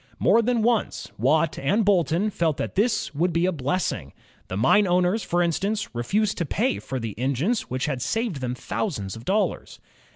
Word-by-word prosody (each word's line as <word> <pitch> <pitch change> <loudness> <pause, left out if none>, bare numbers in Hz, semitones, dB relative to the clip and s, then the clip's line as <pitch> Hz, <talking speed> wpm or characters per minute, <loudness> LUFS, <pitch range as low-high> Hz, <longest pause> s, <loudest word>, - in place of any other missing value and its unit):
More 230 - +4
than 235 -1 +1
once 230 -1 0
Watt 155 +6 +2
and 200 +11 +1
Boulton 190 +1 +2
felt 165 -6 0
that - - -3
this 215 -5 0
would 170 +5 +1
be 170 +1 +1
a 185 - +2
blessing. 140 - -2 0.3
The 95 - -4
mine 190 - +4
owners, 180 +4 +2
for 175 -2 +1
instance, 200 - -1
re 120 - -2
fused 205 - 0
to 170 - 0
pay 245 - 0
for 130 - -5
the 115 -3 -4
engines 140 - 0
which 130 +1 -2
had 135 -4 -2
saved 225 - -1
them 125 -1 -2
thou 220 - 0
sands 100 - -5
of 115 +1 -11
dollars. 205 +3 -1
175 Hz, 195 wpm, -24 LUFS, 135-210 Hz, 0.3 s, More